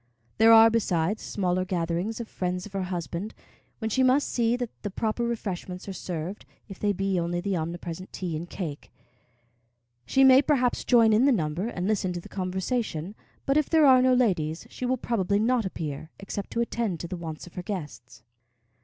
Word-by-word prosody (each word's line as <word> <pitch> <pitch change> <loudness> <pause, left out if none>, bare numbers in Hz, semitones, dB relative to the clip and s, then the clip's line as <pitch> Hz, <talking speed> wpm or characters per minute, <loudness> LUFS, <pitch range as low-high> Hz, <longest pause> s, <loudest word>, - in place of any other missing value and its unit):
There 225 +1 +7
are, 225 0 +8
besides, 200 -3 0
smaller 185 -2 -1
gatherings 180 +4 -2
of 235 - -5
friends 180 -2 -3
of 205 - -12
her 195 - -1
husband, 180 +3 -4 0.4
when 220 -1 -3
she 260 - +2
must 260 +2 +4
see 235 -1 +1
that 245 -2 -4
the 205 - -3
proper 220 +4 -2
refreshments 195 -6 -4
are 195 - -4
served, 180 +1 -5 0.2
if 195 -3 -10
they 205 - +1
be 195 -1 0
only 170 +1 -1
the 195 +1 -1
omnipresent 170 +2 -5
tea 175 -4 -4
and 170 +3 -5
cake. 155 -7 -6 1.2
She 270 - +4
may, 265 0 +8
perhaps, 260 -4 +1
join 230 -3 +5
in 225 +5 +4
the 280 - +5
number 170 -2 -1
and 185 -5 -3
listen 195 -4 0
to 175 - -4
the - - -12
conversation; 190 -1 -2 0.3
but 275 +1 +2
if 305 - +1
there 320 -2 +5
are 260 -2 +7
no 255 0 +4
ladies, 170 -10 0
she 250 - -4
will 255 +1 +1
probably 200 -5 0
not 230 +1 +2
appear, 155 -4 -5
except 195 0 -6
to 235 - 0
attend 230 -7 -2
to 170 - -5
the 180 - -5
wants 160 -3 -7
of 175 - -14
her 180 - -5
guests. 150 - -7
195 Hz, 195 wpm, -27 LUFS, 175-235 Hz, 1.2 s, are